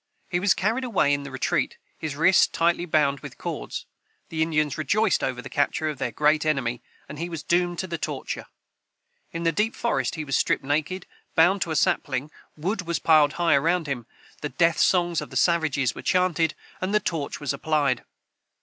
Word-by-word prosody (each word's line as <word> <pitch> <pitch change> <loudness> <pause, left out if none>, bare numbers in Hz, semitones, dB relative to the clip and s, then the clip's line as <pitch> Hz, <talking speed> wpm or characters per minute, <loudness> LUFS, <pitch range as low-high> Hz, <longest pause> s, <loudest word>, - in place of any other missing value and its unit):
He 175 - +1
was 190 -1 +3
carried 225 +7 0
away 200 - +2
in 140 - 0
the 140 - -7
retreat, 130 -1 -1 0.2
his 155 -3 -5
wrists 170 +5 +5
tightly 170 +1 +1
bound 145 -3 +2
with - - -10
cords. - - -5 0.4
The 160 -1 -3
Indians 150 -3 +1
rejoiced 200 +7 +1
over 125 -1 -2
the - - -7
capture 150 +2 0
of 150 -3 -6
their - - -1
great 150 +1 +2
enemy, 135 -6 0 0.3
and 150 - -8
he 170 +1 -3
was 165 -3 -6
doomed 175 0 +1
to 185 - -2
the 170 -3 -4
torture. 145 -4 -4 0.8
In 165 0 -4
the 165 - +3
deep 210 +7 0
forest 235 - -1
he 155 -2 -4
was 135 - -1
stripped - - +1
naked, 155 +6 -1 0.3
bound 180 +4 +4
to - - 0
a 160 - -1
sapling, 140 0 0 0.3
wood 190 +7 -1
was 170 - 0
piled 155 -2 +4
high 170 -1 +2
around 165 +4 +2
him, 125 -5 -4 0.3
the 150 - -3
death 165 +1 +2
songs 175 -2 +3
of - - -7
the - - -4
savages 160 -7 +2
were - - -8
chanted, 170 -4 +1 0.3
and 190 +3 0
the - - +5
torch 160 -7 -3
was 145 -2 -2
applied. 140 -3 0
160 Hz, 195 wpm, -25 LUFS, 145-175 Hz, 0.8 s, wrists